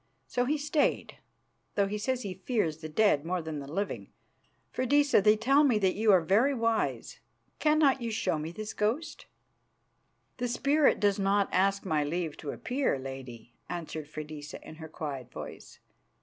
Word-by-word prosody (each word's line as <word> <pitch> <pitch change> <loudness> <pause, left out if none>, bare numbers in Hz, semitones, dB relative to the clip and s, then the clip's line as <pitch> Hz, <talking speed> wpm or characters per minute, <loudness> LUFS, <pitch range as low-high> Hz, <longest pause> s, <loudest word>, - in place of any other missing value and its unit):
So 245 - 0
he 300 +4 +1
stayed, 300 0 0 0.6
though 200 - +3
he 210 +2 -3
says 255 +3 -1
he 195 - -4
fears 185 -5 -1
the 155 -1 -8
dead 155 -3 +3
more 180 +2 -1
than 160 -2 -5
the 140 0 -8
living. 200 +5 -3 0.6
Freydisa, 285 -1 +3
they 210 +2 +5
tell 275 +7 +4
me 255 -7 +4
that 190 -3 +2
you 215 0 +3
are 185 -3 +6
very 220 - +3
wise. 230 -2 -1 0.4
Cannot 300 -4 +3
you 235 - -2
show 215 -7 -1
me 155 +2 -4
this 215 +4 -6
ghost?" 225 +10 -2 1.1
"The 245 - -1
spirit 280 +4 +3
does 205 -1 +2
not 200 0 +2
ask 195 +2 +2
my 155 -4 +1
leave 160 +1 -2
to 150 - -7
appear, 255 - -1
lady," 130 -3 -8 0.2
answered 160 -3 -5
Freydisa 150 -1 -7
in 155 - -10
her 160 -1 -9
quiet 140 -6 -6
voice. - - -9
200 Hz, 165 wpm, -29 LUFS, 155-245 Hz, 1.1 s, are